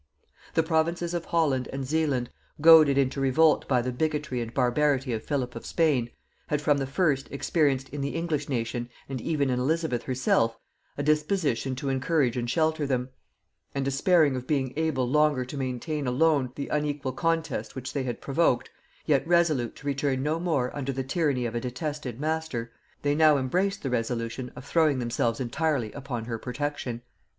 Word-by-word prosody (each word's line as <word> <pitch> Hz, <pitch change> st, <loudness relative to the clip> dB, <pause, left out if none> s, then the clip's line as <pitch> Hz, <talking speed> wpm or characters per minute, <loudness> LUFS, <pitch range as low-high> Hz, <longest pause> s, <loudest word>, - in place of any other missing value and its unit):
The 160 Hz, -, +4 dB
provinces 170 Hz, +1 st, 0 dB
of 170 Hz, -1 st, -2 dB
Holland 145 Hz, -7 st, +1 dB
and 135 Hz, 0 st, -4 dB
Zealand, 145 Hz, -4 st, 0 dB, 0.3 s
goaded 155 Hz, -3 st, +8 dB
into 135 Hz, 0 st, +1 dB
revolt 150 Hz, +4 st, +3 dB
by 125 Hz, -3 st, +2 dB
the 125 Hz, -, -2 dB
bigotry 150 Hz, -1 st, -1 dB
and 115 Hz, -1 st, -5 dB
barbarity 130 Hz, +1 st, +1 dB
of 110 Hz, -, -3 dB
Philip 130 Hz, -5 st, -2 dB
of 115 Hz, -, -7 dB
Spain, 145 Hz, -8 st, +1 dB, 0.4 s
had 150 Hz, -, 0 dB
from 145 Hz, -1 st, +2 dB
the 135 Hz, -, -2 dB
first 140 Hz, -2 st, +1 dB
experienced 140 Hz, -2 st, +1 dB
in 145 Hz, 0 st, -5 dB
the 140 Hz, +2 st, -3 dB
English 160 Hz, -4 st, -2 dB
nation, 120 Hz, -1 st, -2 dB, 0.2 s
and 130 Hz, -3 st, -4 dB
even 145 Hz, -3 st, 0 dB
in 125 Hz, -, 0 dB
Elizabeth 155 Hz, -2 st, 0 dB
herself, 120 Hz, -3 st, +1 dB, 0.4 s
a 145 Hz, -, -2 dB
disposition 150 Hz, -, +1 dB
to 135 Hz, +2 st, -3 dB
encourage 135 Hz, -1 st, +1 dB
and 120 Hz, -1 st, -2 dB
shelter 155 Hz, +2 st, +1 dB
them; 130 Hz, -1 st, -1 dB, 0.7 s
and 135 Hz, -1 st, -1 dB
despairing 145 Hz, +1 st, +3 dB
of 125 Hz, 0 st, -5 dB
being 135 Hz, -4 st, 0 dB
able 150 Hz, -5 st, 0 dB
longer 150 Hz, -1 st, +2 dB
to 130 Hz, -, -8 dB
maintain 135 Hz, +2 st, -3 dB
alone 135 Hz, 0 st, +2 dB
the 140 Hz, -, -5 dB
unequal 145 Hz, -3 st, -1 dB
contest 165 Hz, +4 st, -1 dB
which 130 Hz, -1 st, -6 dB
they 140 Hz, -, -1 dB
had 125 Hz, -3 st, -4 dB
provoked, 135 Hz, -4 st, +1 dB, 0.3 s
yet 145 Hz, -1 st, +2 dB
resolute 160 Hz, -9 st, +2 dB
to -, -, -14 dB
return 140 Hz, -1 st, 0 dB
no 155 Hz, +3 st, 0 dB
more 155 Hz, -8 st, 0 dB
under 140 Hz, -1 st, -2 dB
the 135 Hz, 0 st, -3 dB
tyranny 135 Hz, -3 st, 0 dB
of 115 Hz, -, -3 dB
a 120 Hz, -, -2 dB
detested 130 Hz, -1 st, -4 dB
master, 155 Hz, -6 st, -2 dB, 0.3 s
they 145 Hz, 0 st, +2 dB
now 155 Hz, -1 st, +5 dB
embraced 185 Hz, +10 st, 0 dB
the 135 Hz, -, -1 dB
resolution 120 Hz, +1 st, -2 dB
of 125 Hz, +1 st, -10 dB
throwing 155 Hz, -2 st, +3 dB
themselves 120 Hz, -1 st, -1 dB
entirely 130 Hz, -2 st, -1 dB
upon 130 Hz, -5 st, -5 dB
her 115 Hz, -1 st, -4 dB
protection. 125 Hz, -2 st, -4 dB
140 Hz, 175 wpm, -27 LUFS, 125-155 Hz, 0.7 s, goaded